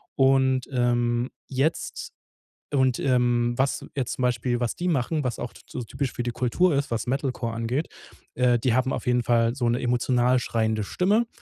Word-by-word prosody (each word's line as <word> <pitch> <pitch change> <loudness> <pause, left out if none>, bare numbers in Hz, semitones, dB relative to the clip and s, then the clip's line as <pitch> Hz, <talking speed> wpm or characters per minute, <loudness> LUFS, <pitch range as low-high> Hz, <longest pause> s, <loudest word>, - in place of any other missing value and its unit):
Und, 130 -1 +3
ähm, 120 0 +1 0.2
jetzt 140 +5 -2 0.6
und, 130 -3 +2
ähm, 120 -2 +2
was 135 +1 0
jetzt 130 -3 -1
zum 130 - -5
Beispiel, 120 0 0
was 120 - -1
die 180 - -3
machen, 150 -1 0
was 120 -2 -2
auch 120 - -5
t - - -16
so 125 - -6
typisch 130 +3 -3
für 120 - -3
die 120 - -2
Kultur 130 +9 +1
ist, 140 -3 -1
was 115 +1 -2
Metalcore 130 -3 -2
angeht, 120 +7 -2 0.5
äh, 125 -1 +3
die 125 -2 +1
haben 130 +1 +1
auf - - -4
jeden 125 -1 +2
Fall 115 +1 +2
so 120 -3 0
'ne 120 +1 +1
emotional 125 +1 +2
schreiende 110 -3 -1
Stimme. 210 - +1
125 Hz, 185 wpm, -25 LUFS, 120-135 Hz, 0.6 s, Und